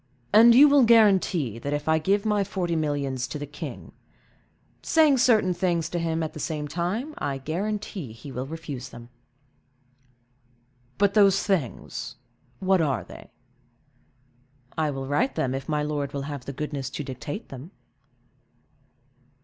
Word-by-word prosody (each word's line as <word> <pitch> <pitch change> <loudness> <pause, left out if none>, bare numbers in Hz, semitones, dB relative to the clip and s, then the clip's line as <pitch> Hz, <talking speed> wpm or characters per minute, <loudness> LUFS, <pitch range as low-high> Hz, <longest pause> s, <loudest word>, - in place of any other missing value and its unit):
"And 230 +2 +8
you 285 +4 +9
will 285 -2 +5
guarantee, 195 - +3
that 140 +4 -3
if 145 +1 -3
I 160 0 +3
give 200 +6 +1
my 210 -2 +2
forty 180 -3 -2
millions 140 -5 -1
to 150 - -5
the 145 - -5
king—" 145 - -8 0.9
"Saying 305 -5 +4
certain 220 -7 +4
things 170 -2 -1
to 175 - -2
him 165 -1 -1
at 155 - -4
the - - -8
same 150 0 -3
time, 185 - -3
I 135 -1 -2
guarantee 185 - -4
he 125 +6 -11
will 130 +1 -5
refuse 155 -5 -7
them." 120 0 -12 1.9
"But 200 0 +2
those 200 -2 +4
things—what 190 - -3
are 140 -4 0
they?" - - -13 1.5
"I 155 -1 0
will 135 -1 -4
write 145 - 0
them, 130 -1 -1
if 135 +2 -5
my 150 -1 0
lord 145 -2 -3
will 140 -1 -3
have 140 -3 -6
the 140 - -6
goodness 145 -1 -4
to 150 - -5
dictate 135 - -7
them." 135 +5 -9
160 Hz, 150 wpm, -25 LUFS, 140-200 Hz, 1.9 s, you